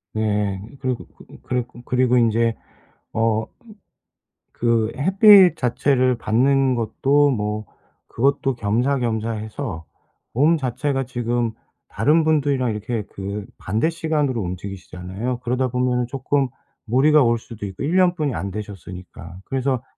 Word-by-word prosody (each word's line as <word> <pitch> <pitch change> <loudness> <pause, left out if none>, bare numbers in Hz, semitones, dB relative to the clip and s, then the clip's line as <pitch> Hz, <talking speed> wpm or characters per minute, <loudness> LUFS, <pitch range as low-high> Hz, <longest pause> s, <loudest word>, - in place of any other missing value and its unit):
네 105 -3 0 0.2
그리고 130 -2 -3
그 - - -18 0.2
그리고 125 -1 -4
그리고 125 0 +2
인제 115 -1 +2 0.6
어 110 -1 +1 1.1
그 115 -1 +1
햇빛 190 - +6
자체를 130 0 +2
받는 130 +4 +2
것도 135 +6 +2
뭐 105 -2 -2 0.4
그것도 135 +1 +1
겸사겸사해서 115 - -2 0.5
몸 150 +7 +3
자체가 135 0 -1
지금 120 -1 -1 0.4
다른 160 +2 +3
분들이랑 140 -6 +1
이렇게 110 +1 -3
그 100 +1 -5
반대 110 - 0
시간으로 155 -7 -1
움직이시잖아요. 95 +5 -5
그러다 125 +1 0
보면은 125 0 0
쪼끔 135 +1 0 0.4
무리가 140 +5 +4
올 115 0 +2
수도 110 -2 -9
있고 95 +3 -6
1 165 +6 +1
년뿐이 175 -6 +2
안 95 +4 -4
되셨으니까. 95 -4 -9
그래서 130 -1 -1
120 Hz, 275 characters per minute, -22 LUFS, 110-140 Hz, 1.1 s, 햇빛